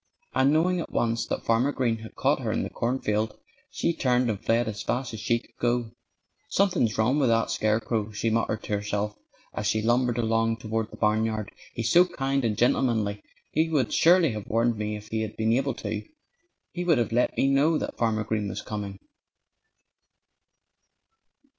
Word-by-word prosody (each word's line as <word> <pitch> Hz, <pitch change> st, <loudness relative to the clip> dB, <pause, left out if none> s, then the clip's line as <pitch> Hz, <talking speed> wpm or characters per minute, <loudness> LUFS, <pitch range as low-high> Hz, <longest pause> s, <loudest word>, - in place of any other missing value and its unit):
And 135 Hz, +2 st, +3 dB
knowing 175 Hz, +4 st, +2 dB
at 165 Hz, -, -5 dB
once 115 Hz, 0 st, 0 dB
that -, -, -3 dB
Farmer 115 Hz, +5 st, +2 dB
Green 120 Hz, -5 st, 0 dB
had 110 Hz, 0 st, -11 dB
caught -, -, +2 dB
her -, -, -2 dB
in -, -, 0 dB
the -, -, -5 dB
cornfield 110 Hz, -3 st, -1 dB, 0.3 s
she 170 Hz, -, -1 dB
turned 125 Hz, -5 st, +1 dB
and 105 Hz, -1 st, -6 dB
fled 115 Hz, +1 st, +2 dB
as 105 Hz, -3 st, -4 dB
fast 125 Hz, +3 st, -2 dB
as 110 Hz, -, -5 dB
she 115 Hz, +2 st, +1 dB
could 115 Hz, -, -16 dB
go. 120 Hz, -1 st, 0 dB, 0.6 s
"Something's 180 Hz, -, +2 dB
wrong 125 Hz, +7 st, +2 dB
with 135 Hz, -4 st, +3 dB
that 115 Hz, 0 st, +2 dB
scarecrow," 110 Hz, 0 st, 0 dB
she 110 Hz, +2 st, -1 dB
muttered 110 Hz, -1 st, 0 dB
to -, -, -4 dB
herself 105 Hz, 0 st, -2 dB, 0.4 s
as 105 Hz, -, -2 dB
she 110 Hz, -, +1 dB
lumbered 120 Hz, +1 st, +2 dB
along 115 Hz, -1 st, +1 dB
toward 110 Hz, 0 st, -3 dB
the -, -, -12 dB
barnyard. 110 Hz, 0 st, 0 dB, 0.2 s
"He's 115 Hz, -1 st, -1 dB
so 175 Hz, +1 st, +7 dB
kind 135 Hz, -3 st, -1 dB
and 110 Hz, -3 st, 0 dB
gentlemanly 110 Hz, -5 st, +1 dB, 0.3 s
he 160 Hz, +2 st, +1 dB
would 140 Hz, -7 st, +1 dB
surely 170 Hz, -3 st, +5 dB
have 105 Hz, -2 st, -6 dB
warned 115 Hz, +1 st, +1 dB
me 105 Hz, 0 st, -3 dB
if 105 Hz, 0 st, -9 dB
he 110 Hz, 0 st, -1 dB
had 110 Hz, -1 st, -5 dB
been 110 Hz, 0 st, +2 dB
able 135 Hz, 0 st, 0 dB
to. -, -, -4 dB, 0.7 s
He 180 Hz, -, -4 dB
would 170 Hz, -4 st, +3 dB
have 120 Hz, -2 st, 0 dB
let 120 Hz, +2 st, +1 dB
me -, -, +3 dB
know 145 Hz, +4 st, +3 dB
that -, -, -5 dB
Farmer 110 Hz, -2 st, +1 dB
Green 105 Hz, -1 st, -2 dB
was -, -, -5 dB
coming." 100 Hz, -2 st, -5 dB
115 Hz, 185 wpm, -26 LUFS, 110-130 Hz, 0.7 s, so